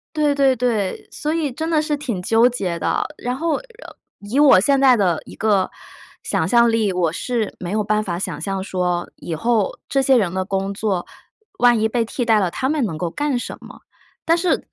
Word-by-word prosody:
对 300 -2 +2
对 270 -2 +3
对， 225 -6 -1
所 305 +1 -3
以 315 -4 -1
真 320 +6 -4
的 310 -2 +3
是 300 -1 -1
挺 245 -10 -4
纠 225 +5 +4
结 195 -9 -2
的。 - - 0
然 245 +1 -3
后， 320 +2 -1 0.6
以 210 +7 -2
我 285 -10 +7
现 275 +8 +2
在 265 -2 +6
的 180 -7 +1
一 - - -12
个 210 -3 +1 0.5
想 - - -1
象 235 -1 +4
力， 220 -4 +1
我 175 -3 +1
是 225 +4 -3
没 175 -1 -5
有 215 +1 0
办 215 +1 0
法 175 -4 -3
想 185 -5 -4
象 195 +3 -3
说， 180 -2 -2
以 170 - -6
后 220 +4 0
这 270 -1 +1
些 265 0 +4
人 200 -8 +2
的 185 +1 -2
工 195 0 -2
作， 200 -3 -2 0.5
万 240 -1 +4
一 220 - +2
被 230 0 0
替 245 +3 -3
代 225 -2 +3
了 185 -4 0
他 260 - -2
们 295 -4 +1
能 175 -7 -4
够 170 +2 -3
干 290 - -1
什 - - -6
么。 - - -13 0.4
但 330 +1 +3
是， 345 0 0
225 Hz, 230 characters per minute, -20 LUFS, 190-265 Hz, 0.6 s, 我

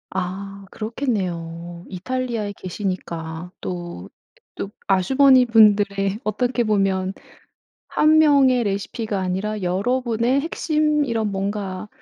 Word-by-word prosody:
아 195 +2 -5
그렇겠네요. 175 -8 -4
이탈리아에 230 +1 -3
계시니까 175 -3 -5
또 175 - -6 0.5
또 195 - -4 0.2
아주머니분들의 210 -3 +4
어떻게 240 +3 0
보면 195 -3 +1 0.7
1 310 +1 +4
명의 275 -5 +5
레시피가 205 +1 -2
아니라 190 +3 -2
여러 195 +9 0
분의 240 +2 +1
핵심 305 -1 +1
이런 225 -5 -1
뭔가 195 0 -3
205 Hz, 240 characters per minute, -22 LUFS, 185-245 Hz, 0.7 s, 명의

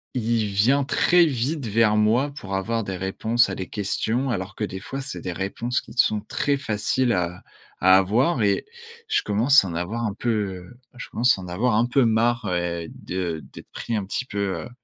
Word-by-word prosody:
il 115 -2 0
vient 120 +8 +3
très 175 +5 +4
vite 135 0 -2
vers 105 0 +3
moi 115 +7 +2
pour 95 -9 -6
avoir 115 +4 -1
des 95 -2 -4
réponses 110 +5 +1
à - - -3
des 95 - -6
questions, 110 +5 -1
alors 95 -2 -4
que 110 - -4
des 95 -2 -4
fois 135 +7 -6
c'est 140 - -6
des 90 - -4
réponses 115 +7 -2
qui - - -14
sont 110 -4 +2
très 140 +6 -1
faciles 120 0 0
à 90 -1 -2 0.4
à 95 +1 +7
avoir 120 - +2
et 100 -1 +1 0.4
je 435 - +2
commence 115 +5 +4
à 95 - -4
en - - -5
avoir 95 +8 -3
un 105 - -2
peu, 120 +3 -3 0.3
heu, 90 +7 -12 0.2
je - - -7
commence 120 -2 +2
à - - -7
en 90 - -8
avoir 105 +6 0
un 115 +2 +3
peu 125 +2 +2
marre 115 -2 +1
et 85 -1 -2
de 90 -3 -4
d'être - - -12
pris 115 - -4
un 105 - -1
petit 100 +6 -3
peu, 100 -7 -3
heu, - - -10
110 Hz, 210 wpm, -24 LUFS, 95-120 Hz, 0.4 s, à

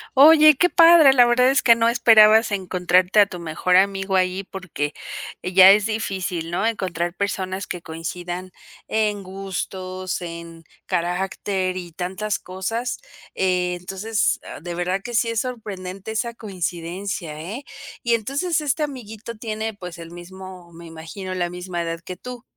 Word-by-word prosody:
Oye, 305 +1 +8
qué 355 +6 +3
padre, 330 -5 +7
la 245 -2 +6
verdad 250 +2 +4
es 275 - +2
que 235 - +6
no 230 0 +2
esperabas 220 -2 +6
encontrarte 185 0 +2
a 205 - +6
tu 180 - -8
mejor 170 +2 0
amigo 195 0 +2
ahí 185 +1 +1
porque, 180 -6 -5 0.5
eh, 180 +1 -4
ya 190 0 +9
es 205 0 +4
difícil, 190 -6 -3
¿no?, 185 +5 -1
encontrar 175 -6 -2
personas 190 -1 -3
que 180 - -5
coincidan 175 +3 -6 0.4
en 210 -2 0
gustos, 185 -1 -5
en 170 -1 -9 0.2
carácter, 185 +1 -2
y 175 -2 -7
tantas 190 +5 -3
cosas. 225 +7 -4 0.4
Entonces, 185 +3 -1
ah, - - -9
de 175 0 -6
verdad 180 +3 -2
que 240 - -7
sí 235 0 +2
es 230 -1 0
sorprendente 200 -5 -7
esa 235 +2 -2
coincidencia, 180 -4 -5
¿eh? 210 - -6 0.4
Y 235 -1 +2
entonces, 285 - -1
este 295 +1 -1
amiguito 235 -5 -7
tiene 220 -1 -4
pues 180 -4 -9
el 165 0 -9
mismo, 180 0 -11
me 170 +1 -12
imagino, 165 +4 -7
la 175 -1 -1
misma 180 -1 -4
edad 165 0 -4
que 180 +1 -8
tú. 250 +3 -9
190 Hz, 155 wpm, -22 LUFS, 180-220 Hz, 0.5 s, ya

